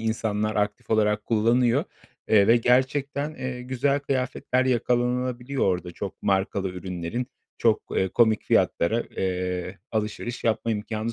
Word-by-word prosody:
insanlar, 110 -1 -1
aktif 105 0 -2
olarak 105 -1 +2
kullanıyor, 115 +2 +3 0.4
eee, 100 -2 +5
ve 115 +2 +6
gerçekten, 135 +5 +1
eee, 125 -3 -5
güzel 135 +3 0
kıyafetler 130 -1 -1
yakalanabiliyor 125 +1 0
orada 90 -2 -1
çok 100 +2 -7
markalı 95 0 0
ürünlerin 90 +5 -4 0.3
çok, 110 -2 +3
eee, 95 - +2
komik 110 +2 +3
fiyatlara, 115 +8 +2
eee, 90 0 -2
alışveriş 110 +2 -3
yapma 115 0 +1
imkânı 110 +1 -3
115 Hz, 125 wpm, -25 LUFS, 105-125 Hz, 0.4 s, ve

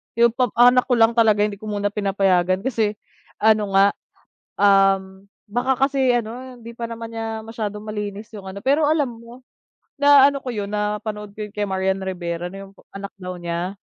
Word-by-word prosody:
yung 235 +1 +5
pa 250 +2 +1
anak 245 +2 +6
ko 255 - 0
lang 230 0 +3
talaga 215 -3 +4
hindi 210 -1 0
ko 215 - -12
muna 205 -1 -1
pinapayagan 195 -2 +1
kasi 225 -4 0 0.5
ano 215 -2 +3
nga, 195 +1 +7 0.7
um, 195 -1 +3 0.2
baka 255 +4 +1
kasi 265 -3 +2
ano 245 +3 -7
hindi 235 0 -10
pa 230 0 -6
naman 230 0 -7
niya 225 -1 -5
masyadong 215 -2 -5
malinis 210 0 -5
yung, 190 -2 -8
ano, 200 +1 -7
pero 285 +4 +3
alam 305 -3 +2
mo 240 +2 -14 0.5
na, 285 -1 +7
ano, 280 - -4
ko 255 -2 -6
yun 205 -2 -4
napanood 210 0 -3
ko 210 0 -6
kay 205 0 -3
Marian 190 0 -1
Rivera 175 -2 -4
na 195 0 -9
yung 195 - -21 0.2
anak 200 0 -7
daw 180 -1 -6
niya 175 +2 -3
210 Hz, 180 wpm, -22 LUFS, 195-235 Hz, 0.7 s, nga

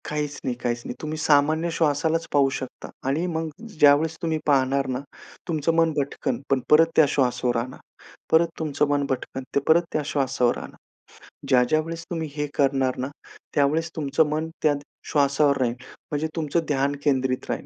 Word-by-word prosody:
काहीच 150 -1 -3
नाही, 125 - -1
काहीच 120 -1 -1
नाही. - - -5
तुम्ही 155 0 -4
सामान्य 155 +2 +3
श्वासालाच 160 +1 +1
पाहू 140 -2 +4
शकता 130 - -8 0.2
आणि 150 +6 0
मग 160 -2 -2 0.3
ज्यावेळेस 150 +2 +5
तुम्ही 160 -1 0
पाहणार 135 -1 +2
ना, 130 -1 -2 0.5
तुमचं 165 -1 0
मन 165 -1 +3
भटकन 140 -1 -2
पण 135 - +3
परत 160 +2 +7
त्या 160 - +7
श्वासावर 125 -3 +1
आणा, 125 +3 -4 0.5
परत 165 +1 +5
तुमचं 150 -2 0
मन 145 -1 +1
भटकन 130 0 -3
ते - - +5
परत 160 +2 +6
त्या 155 - +1
श्वासावर 135 -4 +1
आणा. - - -9 0.7
ज्या 130 -2 +5
ज्या 155 +6 +2
वेळेस 165 +1 -6
तुम्ही 165 -3 -3
हे 150 -1 -1
करणार 135 -2 +1
ना, 130 - -2 0.5
त्यावेळेस 155 +3 +2
तुमचं 155 +1 +1
मन 155 +2 -2
त्या 155 -2 +4 0.4
श्वासावर 140 -1 +3
राहील 120 -2 +1 0.4
म्हणजे 150 +1 -1
तुमचं 165 +1 -1
ध्यान 140 0 +1
केंद्रित 130 -3 0
राहील. - - -3
145 Hz, 170 wpm, -24 LUFS, 135-160 Hz, 0.7 s, परत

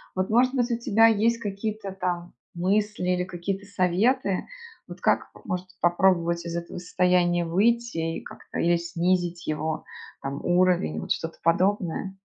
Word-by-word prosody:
Вот, 185 0 -1
может 250 +4 +3
быть, 245 -1 +1
у 235 - +1
тебя 225 -1 +5
есть 225 +2 +2
какие-то 205 -1 -4
там 180 -2 -3 0.2
мысли 195 +1 0
или 180 0 +1
какие-то 190 +2 -4
советы, 195 +2 +1 0.4
вот - - -10
как - - +2 0.2
может 180 -1 -3
попробовать 175 -1 +2
из 170 0 -4
этого 170 +1 -6
состояния 175 0 +2
выйти 195 -2 +1
и - - -7
как-то - - -10
или 170 +1 +3
снизить 175 0 -1
его, 155 +1 -2 0.4
там, 140 +1 -5
уровень, 175 - +2
вот 80 - -6
что-то 165 0 -2
подобное? 185 +2 +1
180 Hz, 145 wpm, -26 LUFS, 170-205 Hz, 0.4 s, тебя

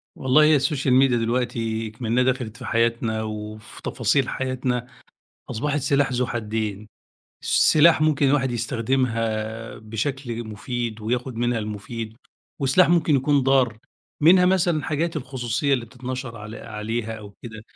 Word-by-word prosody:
والله 130 +4 +4
هي 150 -1 +5
الSocial 135 -2 0
Media 135 -2 +4
دلوقتي 115 -1 -1
اكمنها 115 +3 0
دخلت 125 -3 -1
في - - -9
حياتنا 115 -1 0
وفي 110 0 -7
تفاصيل 125 +2 +1
حياتنا، 125 -2 -2 0.6
أصبحت 145 +6 -1
سلاح 140 0 +1
ذو 125 +1 +1
حدين؛ 110 -3 -3 0.6
سلاح 155 0 +5
ممكن 150 -2 +3
الواحد 135 -2 +2
يستخدمها 115 -2 -2
بشكل 120 +2 -4
مفيد 115 +1 -4
وياخد 125 +3 -2
منها 120 0 0
المفيد، 110 +1 -6 0.4
وسلاح 145 +6 +4
ممكن 165 -4 +3
يكون 140 +2 +3
ضار، 130 -4 +3 0.4
منها 180 +4 +6
مثلًا 175 -5 +2
حاجات 160 +2 -1
الخصوصية 130 0 -1
اللي 125 -3 -1
بتتنشر 125 0 -6
عل 105 +1 -8
عليها 110 +1 -4
أو 105 -2 -10
كده. 110 -2 -8
120 Hz, 130 wpm, -23 LUFS, 110-135 Hz, 0.6 s, منها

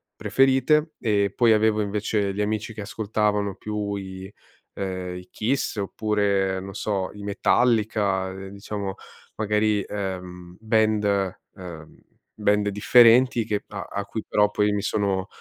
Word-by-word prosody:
preferite; 135 +4 +2
eh, 100 -3 +1
poi 115 -2 +5
avevo 110 0 +3
invece 100 -1 -1
gli 105 - -1
amici 110 +1 -2
che 110 - -6
ascoltavano 105 -1 -1
più 105 0 -3
i, 95 0 -7 0.4
uhm, 95 -2 -4
i 90 0 -11
Kiss 125 +1 -1
oppure, 100 -2 0
non 95 0 -8
so, 100 -3 -2
i 105 0 -10
Metallica, 100 -1 +1
eh, 95 +1 -8
diciamo 100 -1 -5 0.4
magari, 105 -1 +1
ehm, 90 -3 -6
band, 105 -3 +1 0.2
mhmm, 85 -5 -10 0.4
band 105 0 +2
differenti 120 +4 +5
che 105 -2 -2
a 100 -3 -6
a 100 0 -3
cui 105 +2 -5
però 105 0 +2
poi 105 0 +1
mi 105 0 -1
sono 100 -2 -1
105 Hz, 135 wpm, -24 LUFS, 95-110 Hz, 0.4 s, poi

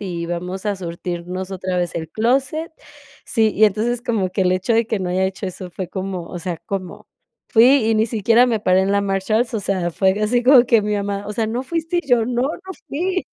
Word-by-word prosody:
Y 170 -4 -4
vamos 180 +3 -4
a 205 - +1
surtirnos 180 +1 -5
otra 185 -1 -3
vez 175 -1 -2
el 160 -1 -4
clóset". 270 +8 0 0.5
Sí, 220 -2 +1
y 215 - +5
entonces, 225 +4 0
como 220 -7 -1
que 190 +1 0
el 180 - +2
hecho 185 +5 0
de 230 0 +2
que 220 - -1
no 185 -1 -3
haya 185 +1 +1
hecho 190 +1 -3
eso 185 0 -7
fue 180 0 -6
como, 185 -2 -5
o 175 - -7
sea, 175 0 -3
¿cómo? 190 -3 -5 0.4
Fui 245 +3 +5
y 225 - +3
ni 220 +1 +2
siquiera 230 +2 +3
me 230 -3 +1
paré 185 -2 +3
en 190 +1 0
la 200 0 +2
Marshalls, 200 +4 0
o 220 - -1
sea, 185 -3 -1
fue 190 +2 +2
de 210 - -3
así 240 +3 +1
como 255 -1 +7
que 230 -2 +4
mi 210 0 -1
mamá: 200 0 -3
"O - - -3
sea, 220 +1 -1
¿no 235 +3 -2
fuiste?" 330 +5 -2
Y 275 - -20
yo: 240 -2 +4
"No, 245 0 0
no 355 +7 -4 0.2
fui". 370 +5 -1
205 Hz, 240 wpm, -20 LUFS, 185-240 Hz, 0.5 s, como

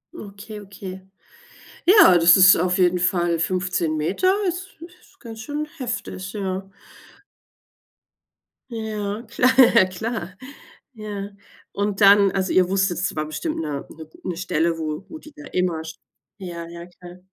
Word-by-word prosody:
Okay, 210 -2 -10
okay. 190 -1 -9 0.9
Ja, 370 - +7
das 170 +2 +7
ist 190 0 +8
auf 180 +1 0
jeden 180 0 +3
Fall 175 -1 +1
15 180 -2 -1
Meter 195 - +1
ist 365 +2 -4 0.3
ist 390 - -25
ganz 225 -3 -10
schön 295 +6 -4
heftig, 240 -6 -5
ja. 195 -1 -4 2.0
Ja, 215 -2 -4
kla 250 -5 +5
klar 190 -1 -5 0.6
Ja. 205 -2 -6 0.4
Und 205 0 -3
dann 200 -1 +6
also, 190 -1 -1
ihr 185 -1 +3
wusstet, 190 -3 0
es 185 - -2
war 155 0 -2
bestimmt 310 - -4
'ne 150 -3 -4 0.4
'ne 175 -2 -4
Stelle, 170 -2 -1
wo 155 +2 -5
wo 320 - -8
die 305 -1 -15
da 295 - -12
immer 180 -3 -1
sp 160 - -10 0.4
ja, 170 -3 -7
ja, 170 0 -10
klar. 180 0 -14
190 Hz, 140 wpm, -22 LUFS, 175-215 Hz, 2.0 s, ist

